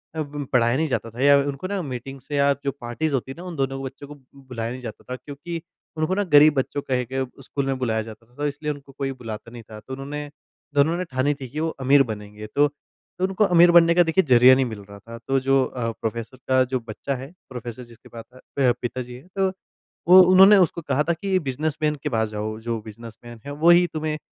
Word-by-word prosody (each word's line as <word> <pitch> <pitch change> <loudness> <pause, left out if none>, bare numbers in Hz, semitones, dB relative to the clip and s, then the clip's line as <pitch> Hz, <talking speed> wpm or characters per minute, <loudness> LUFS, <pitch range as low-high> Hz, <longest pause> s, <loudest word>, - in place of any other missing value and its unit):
अ, 160 - -1
ब 145 -1 -5
पढ़ाया 120 -1 +3
नहीं 160 +1 0
जाता 120 -4 -2
था 120 +3 -7
या 140 +1 +6
उनको 140 +4 -2
ना 200 -1 -2
मीटिंग्स 135 0 -8
या 140 0 +3
जो 140 - 0
पार्टीज़ 130 +6 -2
होती 130 0 -2
हैं - - -8
ना 175 - -9
उन 175 - -6
दोनों 135 -1 -1
को 135 - -6
बच्चों 135 +1 -8
को 145 - -10 0.2
बुलाया 125 -4 -6
नहीं 130 +1 -7
जाता 115 -3 -8
था 125 - -3
क्योंकि 145 +6 -7 0.4
उनको 155 +3 0
ना 205 - +1
गरीब 150 -4 +6
बच्चों 135 +2 -1
कह 130 -2 -1
के 135 0 0 0.2
स्कूल 140 +1 -3
में 135 -1 -1
बुलाया 110 -3 0
जाता 110 +1 -11
था 120 - -27
तो 145 +1 -2
इसलिए 150 +1 -3
उनको 140 -1 -10
कोई 135 0 -3
बुलाता 115 -3 -8
नहीं 120 -1 -10
था। 110 - -8
तो 130 +5 -10
उन्होंने 145 +2 -6 0.4
दोनों 150 +4 +3
ने 180 - -2
ठानी 130 +3 +1
थी 130 - -5
कि 150 - -5
वो 160 +1 0 0.2
अमीर 140 +1 +6
बनेंगे 105 0 -8
तो 145 +7 +3
तो 145 +5 -13
उनको 190 +2 +1
अमीर 175 -2 +6
बनने 170 -1 +6
का 175 - +6
देखिए 170 +3 +2
ज़रिया 125 +1 +8
नहीं 135 - +1
मिल 110 -4 -6
रहा 100 0 -11
था। 115 +3 -11
तो 135 0 +2
जो 135 0 +2
अ, 115 -2 -3
प्रोफ़ेसर 115 +3 -4
का 130 0 +4
जो 130 - +2
बच्चा 135 +5 -4
है 135 +4 -8 0.2
प्रोफ़ेसर 125 -1 -7
जिसके 120 -2 -17
पाता 120 +2 -12 0.2
प 130 -3 +5
पिताजी 125 0 -5
हैं 130 +7 -14
तो 195 -1 +2 0.6
वो 185 +1 +10
उन्होंने 190 +3 +7
उसको 170 - -8
कहा 145 -1 0
था - - +4
कि 170 +5 -7
ये 185 - +3
बिज़नेसमैन 150 +2 -1
के 150 - -1
पास 110 -4 0
जाओ 110 +1 -4
जो 115 -1 -1
बिज़नेसमैन 115 +2 -11
है 145 - -6
वही 175 +1 +7
तुम्हें 155 -1 -2
135 Hz, 240 wpm, -23 LUFS, 120-150 Hz, 0.6 s, वो